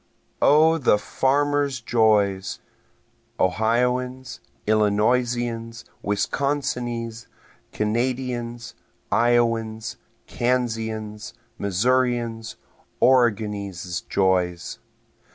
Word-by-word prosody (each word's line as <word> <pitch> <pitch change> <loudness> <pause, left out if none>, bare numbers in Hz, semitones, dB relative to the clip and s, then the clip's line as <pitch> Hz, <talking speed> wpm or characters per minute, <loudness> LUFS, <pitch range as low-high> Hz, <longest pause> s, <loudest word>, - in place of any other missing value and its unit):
O 160 +2 +5
the 125 -6 +4
farmer's 140 +4 0
joys! 105 -5 +2 0.8
Ohioan's, 125 +6 0 0.3
Illinoisian's, 115 +2 +1 0.2
Wisconsinese', 120 0 -2 0.4
Kanadian's, 120 +1 -2 0.4
Iowan's, 115 -2 +1 0.3
Kansian's, 110 -3 -2 0.2
Missourian's, 115 +2 0 0.4
Oregonese' 105 -8 +1
joys! 90 -3 0
115 Hz, 50 wpm, -23 LUFS, 105-125 Hz, 0.8 s, O